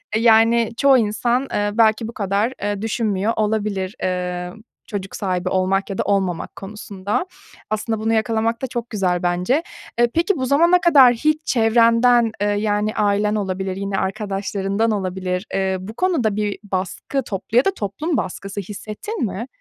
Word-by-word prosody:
E, 220 - +2
yani 230 0 +4
çoğu 275 -1 +5
insan, 240 +4 0
eee, 205 0 0
belki 220 0 +3
bu 235 - -8
kadar, 205 +4 0
eee, 205 -1 -2
düşünmüyor 220 -1 0
olabilir, 210 -2 -1
eee, 180 -1 -2 0.3
çocuk 200 -2 -5
sahibi 185 -2 -2
olmak 190 +1 0
ya 195 - -4
da - - 0
olmamak 190 -4 -1
konusunda. 200 - -4 0.4
Aslında 215 +1 -2
bunu 225 +1 0
yakalamak 225 +1 0
da 265 - -2
çok 240 0 -5
güzel 180 -4 0
bence. 180 - +1 0.4
Eee, 240 0 +4
peki 340 +2 +1
bu 260 - -1
zamana 340 +7 +4
kadar 275 -8 +7
hiç 305 +6 0
çevrenden, 230 0 +4
eee, 205 - +2
yani, 210 +1 0
ailen 210 0 +1
olabilir, 190 -2 -2
yine 195 0 -3
arkadaşlarından 200 +1 -1
olabilir, 185 -1 -2
eee, 190 -1 0
bu 210 +4 -8
konuda 265 - +1
bir 210 -1 -1
baskı, 200 +7 -3
toplu 210 +3 -3
ya 255 - +5
da 390 - +2
toplum 275 - -2
baskısı 195 0 -4
hissettin 215 - -5
mi? 220 +4 -4
210 Hz, 160 wpm, -21 LUFS, 195-235 Hz, 0.4 s, kadar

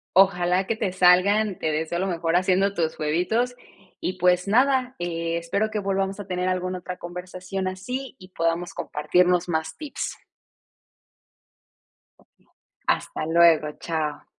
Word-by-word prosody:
Ojalá 185 -1 +4
que 225 - 0
te 210 -4 -2
salgan, 185 +3 +4
te 160 - -1
deseo 160 +3 -1
lo 190 - 0
mejor 165 -1 -1
haciendo 190 +2 +2
tus 160 -3 -1
huevitos, 180 +11 0 0.5
y, 185 - -2
pues 180 +1 +3
nada, 255 +2 +2
eh, 170 -1 -2
espero 200 +6 -1
que 215 - -2
volvamos 195 0 -1
a 205 - -7
tener 180 -1 -1
alguna 185 0 -1
otra 180 0 -7
conversación 185 +2 -5
así, 250 +9 -5
y 185 - -13
podamos 165 0 -1
compartirnos 175 +4 +1
más 160 -1 -2
tips. 300 -2 -5 2.0
Okey. - - -29 0.6
Hasta - - -1
luego, 160 -2 +4
chao. 155 -3 -3
180 Hz, 140 wpm, -24 LUFS, 170-195 Hz, 2.0 s, Ojalá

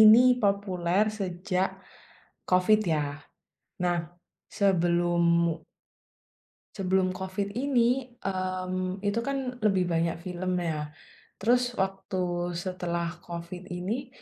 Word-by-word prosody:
ini 215 +1 +10 0.2
populer 195 -2 +2 0.2
sejak, 185 0 -1 0.8
COVID 185 +4 +5
ya, 145 -1 -1 0.6
nah 175 -1 +2 0.6
sebelumu 170 -3 +3 1.1
sebelum 190 -1 +1
COVID 190 +2 -3
ini, 250 -1 +1
mmm, 185 0 -2
itu 205 +2 +1
kan 265 -2 -3
lebih 195 -4 +3
banyak 165 0 +1
film 180 0 -2
ya, 155 -3 -2 0.5
terus 245 +3 +2
waktu 195 0 -3 0.4
setelah 175 -1 -2 0.2
COVID 170 +1 -6
ini, 210 +9 -3
185 Hz, 95 wpm, -28 LUFS, 175-205 Hz, 1.1 s, ini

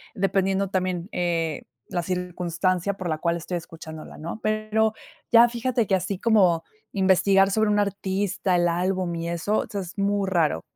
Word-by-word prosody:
dependiendo 195 0 +1
también, 185 -1 -2
eh, 165 -3 -1 0.3
la 175 - -1
circunstancia 180 +1 -1
por 185 -3 -4
la 155 - 0
cual 170 +2 0
estoy 175 +2 -4
escuchándola, 160 -1 -10
¿no?, 170 +7 -6
pero 215 +1 +1 0.4
ya 235 0 +8
fíjate 240 0 0
que 195 - +3
así 185 +1 -2
como 190 -8 +3 0.3
investigar 195 0 +4
sobre 220 +1 +2
un 205 - +2
artista, 195 -1 0
el 175 0 +3
álbum 180 +1 -1
y 165 0 -3
eso, 170 +5 0
o - - -2
sea, 200 - -3
es 185 +2 -9
muy 200 -1 +1
raro. 160 - +1
185 Hz, 165 wpm, -25 LUFS, 170-200 Hz, 0.4 s, ya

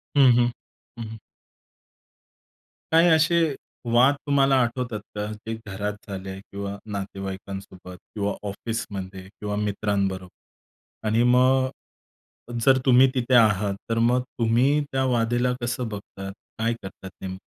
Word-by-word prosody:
हं, 135 -3 +7
हं. 120 0 +4 0.5
हं, - - -3
हं. 110 - -8 1.7
काही 165 +2 +6
असे 160 +2 +4 0.5
वाद 130 +4 +6
तुम्हाला 135 -1 +4
आठवतात 120 -2 -2 0.2
का? 105 0 -2
जे 110 +1 -6
घरात 100 +2 -3
झाले 95 -1 -6
आहे 95 0 -6
किंवा 100 0 -6
नातेवाईकांसोबत 95 -1 -6 0.2
किंवा 100 -1 -1 0.2
ऑफिसमध्ये 100 -3 -5
किंवा 105 0 -5
मित्रांबरोबर 100 -1 -4
आणि 115 +2 +3
मग 130 +1 +4 1.0
जर 135 -1 +6
तुम्ही 130 +1 +7
तिथे 125 0 +2
आहात 105 -3 +4
तर 115 - 0
मग 120 +2 +3 0.2
तुम्ही 125 +6 +3
त्या 135 0 +1
वादेला 120 0 +1
कसं 120 0 -2
बघतात, 100 -2 -7 0.3
काय 115 +1 +1
करतात 95 0 -9
नेमकं? 95 0 -5
110 Hz, 125 wpm, -25 LUFS, 100-125 Hz, 1.7 s, हं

